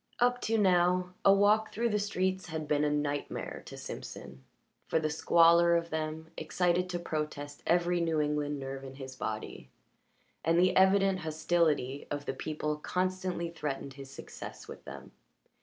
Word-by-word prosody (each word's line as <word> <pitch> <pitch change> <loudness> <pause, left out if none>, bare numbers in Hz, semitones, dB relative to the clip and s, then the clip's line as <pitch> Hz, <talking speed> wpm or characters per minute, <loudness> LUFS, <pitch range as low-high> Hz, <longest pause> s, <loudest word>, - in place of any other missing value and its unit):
Up 245 0 +2
to 225 0 +1
now 180 -2 +3
a 195 - +7
walk 210 +2 +4
through 235 +1 0
the 210 -1 +1
streets 190 -2 -1
had 160 -2 -4
been 150 0 +2
a 150 - +2
night 145 -1 -1
mare - - -5
to - - -9
Simpson, 65 0 -8 0.4
for - - +1
the 155 -1 0
squalor 170 +2 +5
of 170 0 -1
them 160 +1 -4
excited 180 +3 0
to 175 - -2
protest 150 -3 -4
every 175 +1 +2
New 165 -2 +1
England 150 -1 0
nerve 135 0 -6
in 135 0 -9
his 130 -1 -8
body, 110 - -5 0.7
and 165 +1 +3
the 185 +1 +4
evident 190 0 +4
hostility 155 -4 0
of 145 0 -4
the - - -2
people 150 +1 -3
constantly 185 +1 -2
threatened 140 -4 -4
his 135 -1 -10
success - - -9
with - - -10
them. - - -9
165 Hz, 165 wpm, -31 LUFS, 150-185 Hz, 0.7 s, a